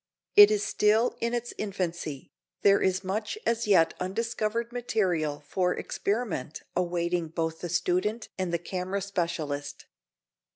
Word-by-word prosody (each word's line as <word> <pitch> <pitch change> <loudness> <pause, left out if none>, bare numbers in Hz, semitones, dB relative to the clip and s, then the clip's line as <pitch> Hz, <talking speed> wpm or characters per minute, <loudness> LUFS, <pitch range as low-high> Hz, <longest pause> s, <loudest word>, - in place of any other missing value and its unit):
It 205 0 +11
is 210 -1 +1
still 215 +4 +2
in 235 +1 0
its 240 0 -3
infancy, 175 -8 -4 0.3
there 200 0 +5
is 190 +1 +1
much 210 - -2
as 230 -1 +1
yet 180 -5 +5
undiscovered 230 +4 -2
material 180 -11 0
for 180 +1 +1
experiment 200 - -3
awaiting 175 -1 0
both 160 0 -3
the 175 - -4
student 185 +6 0
and 185 -2 -2
the 170 - +1
camera 185 +3 -3
specialist. 165 -7 -3
185 Hz, 130 wpm, -28 LUFS, 170-215 Hz, 0.3 s, It